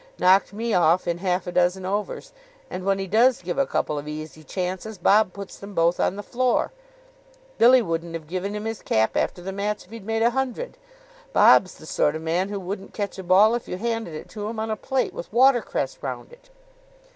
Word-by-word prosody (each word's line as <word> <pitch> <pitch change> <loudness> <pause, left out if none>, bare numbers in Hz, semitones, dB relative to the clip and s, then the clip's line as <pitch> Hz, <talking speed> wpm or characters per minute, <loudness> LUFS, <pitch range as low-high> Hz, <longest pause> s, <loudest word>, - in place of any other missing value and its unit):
Knocked 190 +2 +4
me 225 +2 -2
off 175 +1 +3
in 170 0 -1
half 180 0 -1
a 180 - -4
dozen 180 +1 +1
overs. 210 - -3 0.4
And, 185 - -5
when 195 0 +1
he 195 - -3
does 225 +4 +3
give 175 +8 -3
a 275 - +2
couple 150 - -1
of 145 - -9
easy 155 0 -7
chances, 185 +5 -4
Bob 205 +1 +4
puts 200 0 -9
them 200 0 -10
both 170 +1 +2
on - - +1
the 205 - -6
floor. 250 +2 0 0.9
Billy 245 +1 +7
wouldn't 165 -1 -3
have 160 -2 -6
given 185 +5 -4
him 210 +1 -5
his 225 -2 -4
cap 110 0 +1
after 175 - -1
the 195 - -4
match 205 +2 -3
if 185 - -23
he'd 230 -3 -9
made 225 +2 -1
a 235 - +4
hundred. 265 - -3 0.6
Bob's 185 - +6
the - - -14
sort 150 -1 +1
of 160 - -5
man 175 +4 0
who 205 -1 -3
wouldn't 195 +1 -6
catch 200 -2 -4
a - - -5
ball 195 +5 +5
if 240 - -3
you 180 - -4
handed 225 -5 -3
it 155 - -8
to 210 -1 -5
him 225 -1 -5
on 220 0 -2
a - - 0
plate, 265 +4 -1
with - - -8
watercress 260 - +2
round - - -6
it." - - -19
195 Hz, 220 wpm, -24 LUFS, 180-225 Hz, 0.9 s, Billy